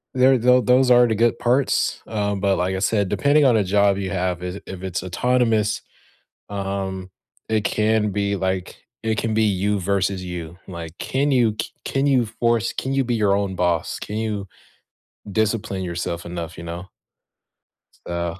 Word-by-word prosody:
there 130 +1 +5
though 125 +2 +5
those 125 +1 +4
are 120 0 +7
the 110 - +1
good 115 +1 +2
parts, 125 +3 +1
um, 105 -2 -1
but 100 -1 +2
like 90 +2 0
I - - -2
said, 100 -1 +1
depending 145 +1 +3
on 125 -3 +5
a 105 - +2
job 100 +1 +3
you 95 -2 -3
have 90 -1 -1
is 90 0 -4
i - - -11
if 95 -1 -7
it's 90 -1 -3
autonomous, 110 +2 +1 0.7
um, 95 -2 -4 0.4
it 110 -1 +1
can 110 0 +1
be, 100 0 0
like, 95 -1 -2 0.3
it 110 -2 0
can 115 - -1
be 110 - +3
you 100 0 +1
versus 95 0 0
you, 85 -2 -6
like, 85 -2 -7
can 140 +2 0
you 120 -4 +3
ca - - -5
can 135 +1 0
you 130 -4 +3
force 115 -1 +2
can 135 - -3
you 135 -1 +2
be 120 - -1
your 100 -2 +3
own 100 -2 -1
boss, 85 -2 0
can 105 - -5
you 105 -3 -3 0.8
discipline 105 -2 0
yourself 85 -1 -4
enough, 85 -1 -6
you - - -8
know? 85 +3 -6 1.2
So 85 0 -3
100 Hz, 180 wpm, -22 LUFS, 95-115 Hz, 1.2 s, are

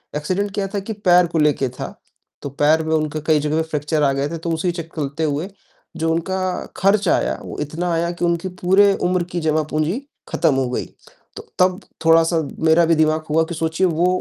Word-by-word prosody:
accident 185 +7 -1
क्या 200 -2 -1
था 200 - +1
कि 220 +3 -5
पैर 180 -3 +4
को 165 -1 -3
लेके 145 -3 +2
था, 125 - -7 0.5
तो 140 - -5
पैर 150 +3 +2
में 160 - -1
उनके 155 0 -1
कई 155 -2 +4
जगह 150 +2 0
फ्रैक्चर 150 -1 -1
आ 140 - +4
गए 140 +1 -1
थे, 165 - -4
तो 165 +1 -4
उसी 175 +2 0
चक 165 -1 -7
कलते 150 +1 -3
हुए 155 +5 -1 0.5
जो 165 0 0
उनका 180 +3 -2 0.4
खर्च 195 0 +2
आया, - - +1
वो - - -8
इतना 165 +4 -3
आया 170 +1 0
कि 175 0 -2
उनकी 170 +2 -1
पूरे 195 +2 +5
उम्र 180 0 +1
की 175 - -2
जमा 155 0 +1
पूंजी 155 - -1 0.3
खत्म 145 - +2
हो 130 -2 0
गई, - - -2 0.5
तो - - -8 0.2
तब 185 +1 +3 0.3
थोड़ा-सा 165 0 +4 0.2
मेरा 160 +2 +5
भी 165 0 +3
दिमाग 155 0 +1
हुआ 160 +1 +3
कि 170 - -4
सोचिए 160 +3 0
वो 170 +2 +1
165 Hz, 210 wpm, -20 LUFS, 155-180 Hz, 0.5 s, पूरे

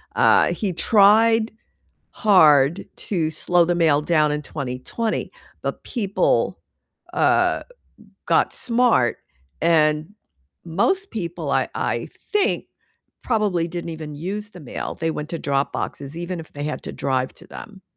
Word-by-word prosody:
Uh, - - +4
he 200 -4 -2
tried 220 +5 +4 0.6
hard 160 -5 +4
to 165 -6 -1
slow 175 +2 +2
the 175 +1 0
mail 155 -4 +3
down 155 -2 +2
in 150 - -2
2020, 140 - -4 0.3
but - - -4
people, 205 -5 0 0.5
uh, - - +2 0.6
got - - +2
smart, 235 - +2 0.4
and 155 +2 +2 0.5
most 370 - 0
people 175 -7 -4
I - - +1
I - - -2 0.2
think 420 0 +1 0.6
probably 205 -8 0
didn't 170 0 -5
even 155 -2 -7
use 200 +7 -5
the 180 - -12
mail. 140 - -5
They 165 -1 -2
went 150 0 -5
to 165 - -4
drop 140 0 -1
boxes 140 +2 -4
even 175 +1 -4
if 160 - -11
they 145 - -7
had 150 - -4
to - - -6
drive 130 -1 -1
to - - -13
them. 200 -3 -11
170 Hz, 135 wpm, -22 LUFS, 150-210 Hz, 0.6 s, Uh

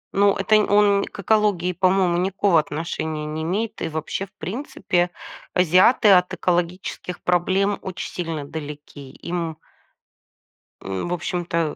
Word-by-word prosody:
Ну, 200 0 +4
это 210 +2 +2
нь 210 - +2
он 205 -1 +4
к - - -9
экологии, 200 -3 +2
по-моему, 185 -1 +2
никакого 190 -1 +2
отношения 155 0 -3
не 155 +1 -4
имеет. 200 +7 -2
И 165 - -2
вообще, 160 +5 -4
в - - -32
принципе, 180 - -2 0.5
азиаты 185 +6 +5
от 180 -1 +5
экологических 180 0 -2
проблем 190 +3 +1
очень 185 -1 -6
сильно 165 -4 -4
далеки. 145 -2 -8
Им 170 -2 -4 1.2
в 95 - -3
общем-то, 170 -2 -2
180 Hz, 130 wpm, -22 LUFS, 160-195 Hz, 1.2 s, азиаты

